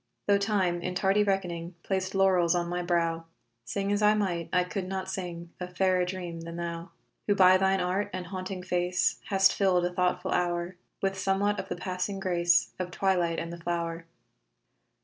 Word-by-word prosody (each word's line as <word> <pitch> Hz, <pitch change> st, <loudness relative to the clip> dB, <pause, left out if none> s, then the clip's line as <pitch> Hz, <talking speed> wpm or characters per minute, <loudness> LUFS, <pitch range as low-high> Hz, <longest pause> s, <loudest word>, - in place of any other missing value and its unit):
Tho' 200 Hz, -1 st, +4 dB
time, 190 Hz, -4 st, +1 dB
in 180 Hz, +1 st, -3 dB
tardy 195 Hz, +2 st, +3 dB
reckoning, 180 Hz, -3 st, -2 dB
Placed 190 Hz, 0 st, -2 dB
laurels 185 Hz, -3 st, +4 dB
on 175 Hz, -1 st, 0 dB
my 175 Hz, +1 st, -2 dB
brow, 170 Hz, -1 st, 0 dB, 0.4 s
Sing 200 Hz, +9 st, -2 dB
as 205 Hz, +1 st, +1 dB
I 210 Hz, 0 st, +5 dB
might, 180 Hz, -5 st, -1 dB
I 180 Hz, -1 st, +3 dB
could 185 Hz, +1 st, -4 dB
not 190 Hz, 0 st, -3 dB
sing 175 Hz, -2 st, -5 dB
A 180 Hz, -, -4 dB
fairer 185 Hz, 0 st, +1 dB
dream 180 Hz, -2 st, -5 dB
than 170 Hz, 0 st, -7 dB
thou 170 Hz, +1 st, -5 dB, 0.4 s
Who 205 Hz, -, +3 dB
by 185 Hz, -1 st, +7 dB
thine 190 Hz, 0 st, +2 dB
art 190 Hz, +3 st, -1 dB
and 185 Hz, -1 st, -5 dB
haunting 185 Hz, 0 st, -5 dB
face 180 Hz, 0 st, 0 dB
Hast 195 Hz, -1 st, +4 dB
filled 185 Hz, -3 st, +2 dB
a 180 Hz, -, -2 dB
thoughtful 180 Hz, +1 st, 0 dB
hour 175 Hz, 0 st, 0 dB, 0.3 s
With 195 Hz, 0 st, 0 dB
somewhat 195 Hz, +2 st, +1 dB
of 190 Hz, -, -6 dB
the -, -, -2 dB
passing 185 Hz, +2 st, -3 dB
grace 175 Hz, -2 st, +2 dB
Of 180 Hz, -1 st, -2 dB
twilight 180 Hz, -3 st, +1 dB
and 170 Hz, 0 st, -4 dB
the 170 Hz, -, -8 dB
flow'r. 170 Hz, -1 st, -3 dB
180 Hz, 185 wpm, -28 LUFS, 175-195 Hz, 0.4 s, by